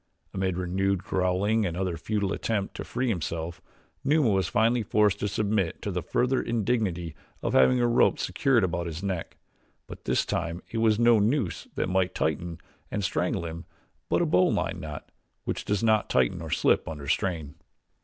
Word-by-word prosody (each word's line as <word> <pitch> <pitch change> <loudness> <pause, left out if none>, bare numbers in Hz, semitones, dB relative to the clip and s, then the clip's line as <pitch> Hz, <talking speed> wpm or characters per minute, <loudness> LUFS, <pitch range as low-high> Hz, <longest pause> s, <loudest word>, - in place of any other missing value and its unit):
Amid 95 -2 -1
renewed 95 +1 0
growling 95 +4 +1
and 85 -4 -2
another 90 -2 -1
futile 100 +4 -1
attempt 105 -4 -2
to - - -5
free 125 +2 -2
himself, 85 -4 -3 0.4
Numa 145 -5 +3
was 95 -3 +1
finally 115 +4 +2
forced 105 -1 +2
to 105 - -1
submit 100 -3 0
to 100 - -2
the 90 -1 -2
further 125 +9 +1
indignity 105 -8 -1 0.3
of - - -1
having 95 - +5
a 120 - +3
rope 120 +1 +4
secured 130 -6 +2
about 85 -1 -1
his 85 +3 -6
neck; 95 -4 -3 0.5
but - - -11
this - - +1
time 85 +1 -3
it 115 - -2
was 110 -2 +3
no 120 -1 +5
noose 110 - 0
that - - 0
might 95 0 0
tighten 80 +2 -1 0.3
and - - -2
strangle 85 - -1
him; 85 0 -6 0.4
but - - +2
a - - +2
bowline 90 +4 +2
knot, 75 -2 -8 0.3
which - - -3
does 105 0 0
not 110 -2 +3
tighten 65 -2 +2
or - - -6
slip - - +2
under 75 -3 -6
strain. 80 -2 -1
95 Hz, 175 wpm, -27 LUFS, 85-110 Hz, 0.5 s, having